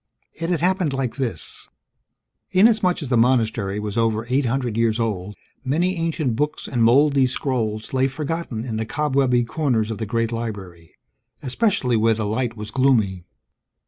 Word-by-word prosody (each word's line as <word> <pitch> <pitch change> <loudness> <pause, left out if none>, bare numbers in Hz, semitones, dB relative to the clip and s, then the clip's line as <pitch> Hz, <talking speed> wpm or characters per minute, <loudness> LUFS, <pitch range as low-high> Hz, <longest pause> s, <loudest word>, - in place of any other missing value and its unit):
It 165 +1 -4
had 175 -3 0
happened 180 -4 +1
like 135 -2 -2
this. 120 - -5 0.8
Inasmuch 190 -3 +3
as 135 - -6
the 125 - +2
monastery 110 -4 +1
was 105 0 -4
over 115 -1 +1
eight 135 +1 +2
hundred 120 -2 -1
years 115 0 +1
old, 105 -3 -2 0.3
many 170 +8 0
ancient 160 -7 -1
books 150 +5 -2
and 120 -3 0
moldy 135 +3 +4
scrolls 115 -5 -2
lay 130 0 +3
forgotten 140 -4 -4
in 115 -3 -3
the 110 - -2
cobwebby 135 -3 +1
corners 120 -4 0
of 110 - -5
the 110 - -3
great 115 +1 -1
library, 100 -8 -6 0.5
especially 135 - +1
where 110 +1 +3
the 110 -1 -2
light 115 +2 -2
was 105 0 -6
gloomy. 110 -9 +2
120 Hz, 160 wpm, -22 LUFS, 110-145 Hz, 0.8 s, moldy